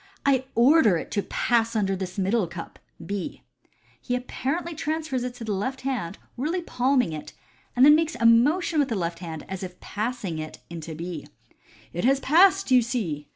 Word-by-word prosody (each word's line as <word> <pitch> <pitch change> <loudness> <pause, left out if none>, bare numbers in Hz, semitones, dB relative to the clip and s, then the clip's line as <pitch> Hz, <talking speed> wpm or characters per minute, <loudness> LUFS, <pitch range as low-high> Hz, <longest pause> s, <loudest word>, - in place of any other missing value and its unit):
"I 265 -2 +3
order 235 - +5
it - - -7
to 205 - 0
pass 230 +2 0
under 195 -3 +1
this 185 0 -6
middle 195 +1 +1
cup 170 0 -9
" 165 - -14
(B). 200 -3 -4 0.6
He 250 - -2
apparently 275 +7 -3
transfers 310 -4 -2
it 250 -1 -4
to 245 - -8
the 220 - -3
left 260 +7 -3
hind, 245 -10 -3 0.2
really 330 +8 -1
palming 250 - +1
it, 150 - -7 0.4
and 250 +2 +6
then 295 - +9
makes 315 -2 +2
a 230 - +1
motion 295 +9 +4
with 285 - +2
the 230 - -1
left 170 -3 -2
hand, 165 -3 -7
as 190 -1 -5
if 180 -1 -7
passing 210 -6 -3
it 155 0 -6
into 165 -1 -6
B. 170 -1 -6 0.3
" - - -27
It 175 - -3
has 270 +2 +4
passed, 365 +4 +4
you 250 -1 +7
see 190 - -3
235 Hz, 195 wpm, -25 LUFS, 180-270 Hz, 0.6 s, then